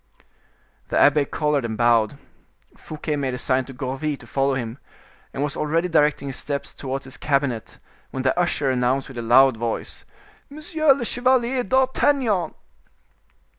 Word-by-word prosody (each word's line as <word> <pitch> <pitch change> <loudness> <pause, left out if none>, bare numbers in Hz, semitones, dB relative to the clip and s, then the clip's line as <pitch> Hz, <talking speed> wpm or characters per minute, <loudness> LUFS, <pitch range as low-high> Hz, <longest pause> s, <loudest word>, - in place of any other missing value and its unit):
The - - 0
abbe 145 0 +5
colored 150 -2 0
and 110 -2 -4
bowed. 120 +2 +3 0.6
Fouquet 155 0 -5
made 135 -3 -2
a - - -5
sign 130 0 0
to 135 - -10
Gourville 135 +3 -3
to 125 - -15
follow 135 +4 0
him, 120 0 -5 0.5
and 140 - -3
was 145 +1 -2
already 165 +3 0
directing 150 -3 +2
his 135 - -4
steps 140 0 -4
towards 135 0 -5
his 130 - -9
cabinet, 135 -6 -1 0.3
when 130 - -4
the 130 - +2
usher 170 -6 +1
announced 130 +2 0
with 130 -3 -7
a - - -2
loud 125 +2 +5
voice: 115 0 -4 0.5
"Monsieur 310 +1 +1
le 255 -3 -4
Chevalier 250 +1 +1
d'Artagnan." 260 - +1
140 Hz, 155 wpm, -23 LUFS, 130-165 Hz, 0.6 s, abbe